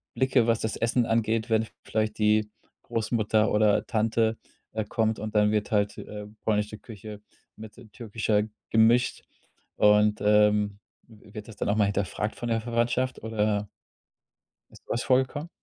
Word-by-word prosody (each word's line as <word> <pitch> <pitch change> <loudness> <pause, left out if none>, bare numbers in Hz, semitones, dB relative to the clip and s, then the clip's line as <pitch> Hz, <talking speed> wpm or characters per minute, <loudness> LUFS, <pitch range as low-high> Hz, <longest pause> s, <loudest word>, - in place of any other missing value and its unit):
Blicke, 130 -2 +2
was 115 -1 +2
das 110 - -2
Essen 115 +1 +1
angeht, 115 0 0
wenn 110 0 +2 0.2
vielleicht 110 0 -2
die 105 0 +2 0.3
Großmutter 110 -2 0
oder 105 0 +2
Tante, 110 0 +1 0.4
äh, 110 -1 -2
kommt 110 0 0
und 110 +1 -5
dann 105 0 +4
wird 105 -1 -1
halt, 105 -1 +1
äh, 105 -1 -8 0.2
polnische 105 0 -1
Küche 105 -1 -10 0.3
mit, 110 -1 -11
äh, 120 - -13
türkischer 110 -1 -1 0.3
gemischt 115 +3 +3 0.5
und, 105 0 +4
ähm, 105 -1 +3 0.3
w 105 -2 -18
wird 105 -1 -7
das 110 - -11
dann - - -2
auch 100 - +2
mal 105 - +4
hinterfragt 100 +1 -2
von 120 - -5
der 115 0 +1
Verwandtschaft 120 +2 -1
oder 105 -2 -1 1.0
ist - - -17
sowas 120 - -2
vorgekommen? 130 +4 +1
110 Hz, 155 wpm, -26 LUFS, 105-115 Hz, 1.0 s, dann